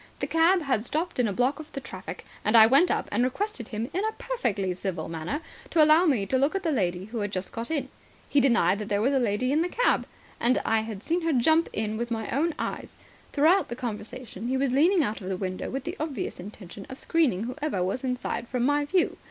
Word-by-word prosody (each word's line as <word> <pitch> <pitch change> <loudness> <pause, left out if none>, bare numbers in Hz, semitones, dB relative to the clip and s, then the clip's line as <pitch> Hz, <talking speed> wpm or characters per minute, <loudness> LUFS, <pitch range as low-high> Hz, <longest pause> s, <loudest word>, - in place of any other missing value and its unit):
The - - -1
cab 330 +2 +3
had 260 -7 0
stopped 315 +5 -2
in 245 - +3
a - - -1
block 250 +8 +1
of 310 - -10
the - - -3
traffic, 265 - -8 0.2
and 215 +2 +4
I 220 - +10
went 275 +10 +5
up - - 0
and 230 +4 +2
requested 260 - -2
him 220 +2 -3
in 380 - 0
a 440 - 0
perfectly 210 - -2
civil 185 0 -4
manner 165 - -4 0.3
to 320 - +5
allow 310 +4 +6
me 240 -10 +2
to 260 +6 +1
look 280 +7 +2
at 390 - -1
the 325 - +1
lady 185 -7 -1
who 225 +2 -5
had 205 -1 -2
just 185 -1 -4
got 230 0 -5
in. 290 -5 -1 0.4
He 285 - +3
denied 220 -7 +3
that 210 - -5
there 205 -1 +1
was 260 +6 +2
a 270 - +3
lady 240 +2 0
in 305 +3 +3
the 350 - 0
cab. - - +1 0.3
And 250 +2 +3
I 225 - +3
had 220 -2 -6
seen 340 +2 0
her 330 0 0
jump 315 +5 +3
in 215 0 -2
with 235 +1 -3
my 225 -2 -3
own 310 +5 +1
eyes. - - -5 0.3
Throughout 325 +7 +4
the 240 - -5
conversation 235 -1 -6
he 260 +1 0
was 270 -1 +1
leaning 330 +6 +4
out 215 -3 -3
of 185 - -5
the 190 - -2
window 185 -1 -4
with 270 0 -4
the - - -4
obvious 295 -8 -4
intention 195 0 -10
of 260 - -8
screening 270 - +1
whoever 255 -5 -2
was 195 +8 -2
inside 250 -2 -3
from 245 0 -1
my 290 +2 +2
view. 360 +4 +1
250 Hz, 240 wpm, -27 LUFS, 210-305 Hz, 0.4 s, I